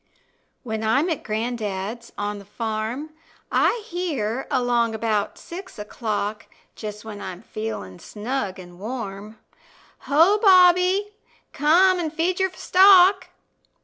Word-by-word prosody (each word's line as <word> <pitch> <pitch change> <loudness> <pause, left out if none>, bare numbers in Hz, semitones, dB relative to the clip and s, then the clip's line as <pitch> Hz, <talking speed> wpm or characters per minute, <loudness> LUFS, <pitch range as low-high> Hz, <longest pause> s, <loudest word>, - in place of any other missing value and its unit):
When 220 -3 -4
I'm 275 +11 +2
at 315 - -2
gran'dad's 220 0 -4
on 205 0 -3
the 200 - -13
farm, 225 +7 -4 0.4
I 460 -2 +2
hear 285 - -3
along 240 -4 +1
'bout 215 -2 -1
six 370 +2 -10
o'clock, 210 0 -4 0.3
Just 210 0 -7
when 210 -2 -8
I'm 185 +2 -7
feelin' 215 - -6
snug 210 -2 -4
an' 175 -1 -13
warm, 215 -2 -6 0.7
"Ho, 335 +9 +5
Bobby, 370 +1 +5 0.4
come 355 +6 +4
and 320 -3 -2
feed 335 +4 -1
your 380 0 +2
stock." 375 0 +5
235 Hz, 115 wpm, -23 LUFS, 210-350 Hz, 0.7 s, Ho